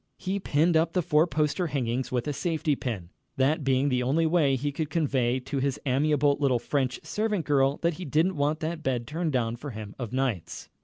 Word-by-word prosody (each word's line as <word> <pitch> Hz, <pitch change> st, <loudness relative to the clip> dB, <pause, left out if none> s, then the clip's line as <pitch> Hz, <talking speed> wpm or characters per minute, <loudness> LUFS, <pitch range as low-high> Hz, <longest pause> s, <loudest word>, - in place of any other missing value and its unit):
He 190 Hz, +1 st, -2 dB
pinned 165 Hz, -1 st, +2 dB
up 160 Hz, +1 st, +2 dB
the 180 Hz, -, +1 dB
four 155 Hz, 0 st, +3 dB
poster 155 Hz, +2 st, 0 dB
hangings 130 Hz, -3 st, -2 dB
with 125 Hz, 0 st, -1 dB
a 150 Hz, -, -1 dB
safety 155 Hz, 0 st, 0 dB
pin, 100 Hz, -10 st, -5 dB, 0.3 s
that 140 Hz, +3 st, +2 dB
being 135 Hz, +1 st, +2 dB
the 125 Hz, -2 st, +1 dB
only 145 Hz, +6 st, +2 dB
way 155 Hz, -5 st, +3 dB
he 145 Hz, +3 st, -2 dB
could 150 Hz, +1 st, -3 dB
convey 130 Hz, -7 st, +1 dB
to 135 Hz, +2 st, -3 dB
his 140 Hz, +1 st, -1 dB
amiable 145 Hz, +1 st, +2 dB
little 135 Hz, -4 st, +3 dB
French 130 Hz, +1 st, -1 dB
servant 210 Hz, -5 st, -1 dB
girl 140 Hz, -1 st, +2 dB
that 170 Hz, 0 st, +2 dB
he 180 Hz, -, -5 dB
didn't 160 Hz, +6 st, +1 dB
want 150 Hz, +2 st, 0 dB
that 160 Hz, +1 st, -3 dB
bed 125 Hz, -4 st, -1 dB
turned 160 Hz, +3 st, -2 dB
down 120 Hz, -3 st, 0 dB
for 145 Hz, +4 st, -7 dB
him 110 Hz, -4 st, -7 dB
of 120 Hz, -4 st, -4 dB
nights. 130 Hz, -9 st, -2 dB
145 Hz, 210 wpm, -27 LUFS, 130-160 Hz, 0.3 s, four